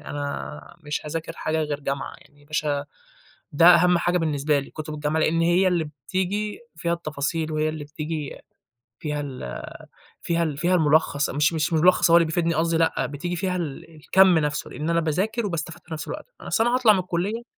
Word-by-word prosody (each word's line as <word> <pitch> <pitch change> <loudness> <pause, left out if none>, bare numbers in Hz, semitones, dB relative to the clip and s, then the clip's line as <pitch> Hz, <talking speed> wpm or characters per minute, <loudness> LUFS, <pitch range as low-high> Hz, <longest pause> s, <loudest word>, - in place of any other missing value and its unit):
أنا 75 - -6
مش 150 -2 -3
هاذاكر 165 +2 -4
حاجة 160 0 -1
غير 150 -1 -3
جامعة 140 0 -3
يعني، 145 0 -22
مش 155 0 0
ه 145 -1 0 0.7
ده 165 +3 +5
أهم 180 0 +7
حاجة 175 +1 +1
بالنسبة 150 -2 +1
لي، 140 - -6
كُتُب 155 0 -6
الجامعة 150 +1 -1
لإن 165 +1 +2
هي 175 +3 +4
اللي 175 -3 +1 0.2
بتيجي 205 +3 -2 0.2
فيها 170 +1 -1
التفاصيل، 155 -1 -2
وهي 155 0 +1
اللي 155 -1 -5
بتيجي 150 0 -5 0.6
فيها 150 -1 -3
ال 130 - -6 0.6
فيها 170 0 0
ال 150 -4 -2
فيها 175 +4 +2
المُلخّص، 150 -3 +2
مش 150 +3 +2
مش 160 +1 0
مُلخّص 175 +2 +4
هو 170 - +8
اللي 170 - +4
بيفيدني 165 +1 0
قصدي 165 +1 +1
لأ، 165 0 +1
بتيجي 160 +5 -4
فيها 185 +1 -1
ال 165 -1 -5
الكَمّ 185 +3 +4
نفسُه، 150 -1 -1
لإن 155 +2 -4
أنا 170 0 +3
باذاكر 190 +9 -1
وباستفاد 170 -4 -4
في 160 - -8
نفس 155 0 -5
الوقت، - - -6 0.2
أصل 225 - +1
أنا 240 +1 +2
هاطلع 245 -4 +5
من 195 - +1
الكُلِّيَّة 185 +6 -2
160 Hz, 190 wpm, -24 LUFS, 150-175 Hz, 0.7 s, هو